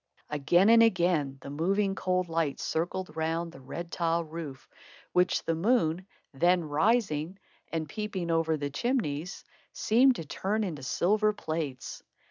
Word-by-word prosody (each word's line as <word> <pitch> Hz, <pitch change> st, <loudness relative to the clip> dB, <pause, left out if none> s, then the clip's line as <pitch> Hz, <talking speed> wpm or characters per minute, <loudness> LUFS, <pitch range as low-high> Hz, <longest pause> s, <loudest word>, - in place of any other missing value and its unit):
Again 175 Hz, +7 st, +3 dB
and 230 Hz, 0 st, +7 dB
again 170 Hz, -10 st, +2 dB
the 140 Hz, -, -8 dB
moving, 195 Hz, +6 st, +1 dB
cold 185 Hz, -1 st, 0 dB
light 165 Hz, -3 st, -1 dB
circled 175 Hz, +2 st, -3 dB
round 165 Hz, +1 st, -1 dB
the 150 Hz, -, -13 dB
red 170 Hz, +6 st, -7 dB
tile 170 Hz, 0 st, 0 dB
roof, 155 Hz, -4 st, -8 dB, 0.4 s
which 180 Hz, 0 st, +2 dB
the 165 Hz, -, 0 dB
moon, 180 Hz, -1 st, +1 dB, 0.3 s
then 175 Hz, +5 st, +3 dB
rising 160 Hz, +1 st, +1 dB, 0.3 s
and 160 Hz, -2 st, -2 dB
peeping 190 Hz, -1 st, -3 dB
over 165 Hz, -1 st, +1 dB
the 145 Hz, -1 st, -4 dB
chimneys, 180 Hz, -, -2 dB, 0.3 s
seemed 250 Hz, +4 st, +4 dB
to 165 Hz, -, -6 dB
turn 210 Hz, +8 st, -1 dB
into 165 Hz, -8 st, -4 dB
silver 210 Hz, +10 st, +2 dB
plates. 155 Hz, -8 st, -4 dB
170 Hz, 140 wpm, -29 LUFS, 155-195 Hz, 0.4 s, and